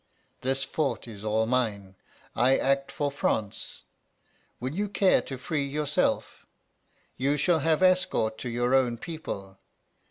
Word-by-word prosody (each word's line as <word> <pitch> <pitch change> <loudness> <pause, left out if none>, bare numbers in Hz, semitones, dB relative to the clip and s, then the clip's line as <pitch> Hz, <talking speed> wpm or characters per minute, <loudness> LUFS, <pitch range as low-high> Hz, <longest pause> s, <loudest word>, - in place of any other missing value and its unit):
This 135 +1 0
fort 140 -2 -2
is 105 -3 -9
all 110 +1 +1
mine: 110 -6 -1 0.4
I 130 +3 +4
act 135 0 +1
for 145 -1 -1
France. 110 -7 -2 0.8
Will 130 +3 -3
you 205 +4 -1
care 195 -1 +4
to 135 - -7
free 145 +3 -2
yourself? 150 +1 -1 0.7
You 140 +3 +1
shall 165 +3 +3
have 160 +3 +2
escort 180 -12 +2
to 125 - -4
your 120 +2 0
own 125 -3 +3
people. 100 - -7
135 Hz, 135 wpm, -27 LUFS, 115-150 Hz, 0.8 s, I